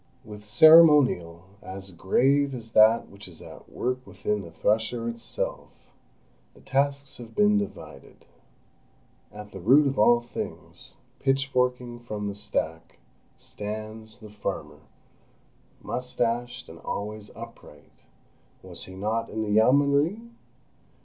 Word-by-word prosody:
With 105 -1 -10
ceremonial 130 - +6 0.2
as 95 +1 -8
grave 135 +10 +1
as 115 -2 -9
that 110 +1 +5
which 100 +1 -11
is 85 -3 -14
at - - -13
work 130 +1 -3
within 105 -1 -3
the 85 - -10
thresher 110 +7 -1
itself, 115 0 -6 0.6
the - - -18
tasks 140 0 -1
have 115 -2 -11
been 210 0 +4
divided. 205 - -9 1.1
At 105 0 -11
the 95 - -9
root 130 +11 +5
of 135 -3 -1
all 120 +3 +5
things, 120 0 -8 0.2
pitchforking 125 -3 0
from 105 -3 -5
the 100 - -3
stack, 80 -6 -4 0.4
stands—the 110 +1 -8
farmer, 105 0 -5 1.0
moustached, 120 -1 -3
and - - -12
always 105 0 -6
upright 115 -10 -13 0.7
was - - -11
he 95 - -11
not 110 +4 -2
in 110 0 -3
the 105 - -3
Yeomanry? 140 - +3
115 Hz, 115 wpm, -26 LUFS, 105-130 Hz, 1.1 s, ceremonial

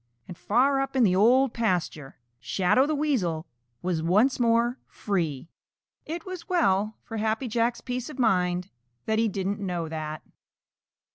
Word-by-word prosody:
And 180 - -8
far 270 +9 +2
up 270 0 -4
in 260 - +4
the 185 -4 +4
Old 245 +6 +4
Pasture, 175 -10 -2 0.2
Shadow 185 - +2
the 310 - 0
Weasel 205 - 0 0.4
was 175 -3 -1
once 210 +12 +3
more 235 +1 +2
free. 165 -7 -3 0.6
It 330 +1 -5
was 370 -1 -8
well 215 - +2
for 225 - -6
Happy 220 +4 -1
Jack's 235 +1 0
peace 250 +1 -4
of 300 - -9
mind 180 -5 +1 0.3
that 220 0 +1
he 225 - +3
didn't 200 0 -2
know 175 -4 -3
that. 155 -1 -5
220 Hz, 150 wpm, -26 LUFS, 180-255 Hz, 0.6 s, in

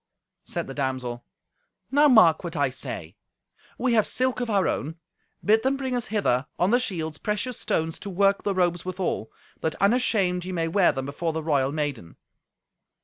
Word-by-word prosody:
Said - - -3
the 135 - -7
damsel, 130 -3 -3 0.7
"Now 290 +2 +5
mark 185 - +6
what 170 -1 -5
I 140 -3 +1
say. 130 - -6 0.6
We 255 -2 +1
have 220 -2 +3
silk 255 0 0
of 245 -2 -2
our 200 -3 +2
own; 155 +4 -2 0.5
bid 220 +2 +4
them 265 +2 +1
bring 260 -2 -2
us 245 - -2
hither, 145 - 0
on 180 +4 +2
the 245 - +5
shields, 160 - -3
precious 215 +4 -3
stones 160 0 -1
to 200 - -6
work 195 +1 +2
the 200 -2 -1
robes 175 -2 +1
withal, 185 - -3 0.3
that 160 -1 -2
unashamed 200 -4 +2
ye 185 - -5
may 165 -2 0
wear 180 +2 +4
them 135 0 -4
before 160 +4 -3
the 160 0 -3
royal 140 -4 +1
maiden." 145 - -4
180 Hz, 180 wpm, -25 LUFS, 150-215 Hz, 0.7 s, mark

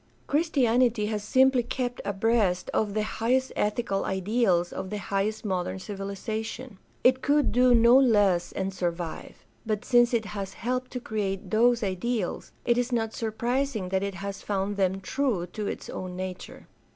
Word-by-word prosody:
Christianity 250 -7 +2
has 210 -1 -2
simply 260 +3 +4
kept 245 +1 -3
abreast 200 -3 +1
of 210 -1 0
the 215 - +1
highest 245 +4 0
ethical 210 -1 0
ideals 190 -2 +1
of 190 - -5
the 210 - -3
highest 205 +2 -2
modern 185 -2 -2
civilization. 205 +3 -5 0.2
It 255 +1 +4
could 290 0 +2
do 250 0 +5
no 235 +3 +7
less 205 -9 +3
and 190 0 -3
survive. 175 -2 -4 0.2
But 215 -2 -2
since 240 -1 +4
it 230 -3 +1
has 195 -2 -5
helped 250 +3 -3
to 250 - -2
create 200 -5 -3
those 235 +1 +3
ideals, 195 +1 -2
it 240 0 +3
is 245 +1 -1
not 225 -2 0
surprising 235 -1 -2
that 190 0 0
it 200 -1 -3
has 195 +1 -6
found 200 0 -2
them 190 -1 0
true 220 -3 -1
to 210 -2 -3
its - - -5
own 185 -1 -6
nature. 185 0 -7
215 Hz, 160 wpm, -27 LUFS, 195-245 Hz, 0.2 s, no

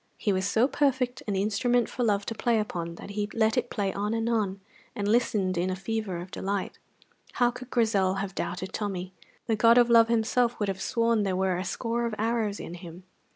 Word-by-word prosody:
He 205 - 0
was 190 +1 0
so 225 +5 +3
perfect 260 -4 0
an 205 - -1
instrument 220 +4 +1
for 250 - -3
love 205 -3 +1
to - - -3
play 235 +1 +1
upon 170 -5 -4
that 200 - -9
he 205 0 -2
let 220 -1 +2
it 245 -1 0
play 200 -3 -1
on 210 +3 -1
and 225 0 -1
on, 210 -4 0 0.4
and 205 -1 -2
listened 205 -5 +1
in 180 +2 0
a 185 - -1
fever 205 -1 -3
of 175 +2 -8
delight. 200 0 -3 0.5
How 245 -1 +3
could 255 +1 -10
Grizel 205 -6 +2
have 195 0 -3
doubted 185 0 -4
Tommy? 190 -3 -4 0.3
The 225 - +1
god 230 +2 +5
of 240 -1 +5
love 230 -1 +7
himself 235 +1 +1
would 205 -2 0
have 190 0 -3
sworn 230 +2 +1
that - - +1
there 190 -1 0
were 190 0 +1
a 180 - -2
score 235 +4 -2
of 225 - -4
arrows 220 -2 0
in - - -7
him. 175 0 -10
210 Hz, 220 wpm, -27 LUFS, 190-235 Hz, 0.5 s, love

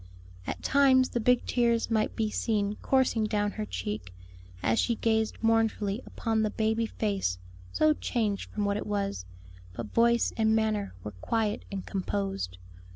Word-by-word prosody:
At - - -4
times 265 -2 +4
the 240 - -1
big 250 +2 +3
tears 235 -2 +1
might 220 -1 +1
be 215 -1 0
seen 210 -2 0
coursing 260 -4 +2
down 205 -1 0
her 105 - -5
cheek, 90 +1 -4 0.5
as 115 0 +2
she 235 - +2
gazed 220 -1 0
mournfully 225 -1 +1
upon 225 -2 -1
the 215 - +1
baby 220 +1 0
face 200 - -1 0.3
so 310 0 +4
changed 220 -8 -2
from 210 -1 -2
what 200 0 +1
it - - -5
was; 200 - -2 0.5
but 105 +2 -7
voice 235 0 +3
and 220 -1 +3
manner 215 - 0
were 105 - -5
quiet 210 - -2
and 195 -2 -4
composed. 195 - -3
215 Hz, 155 wpm, -29 LUFS, 200-230 Hz, 0.5 s, times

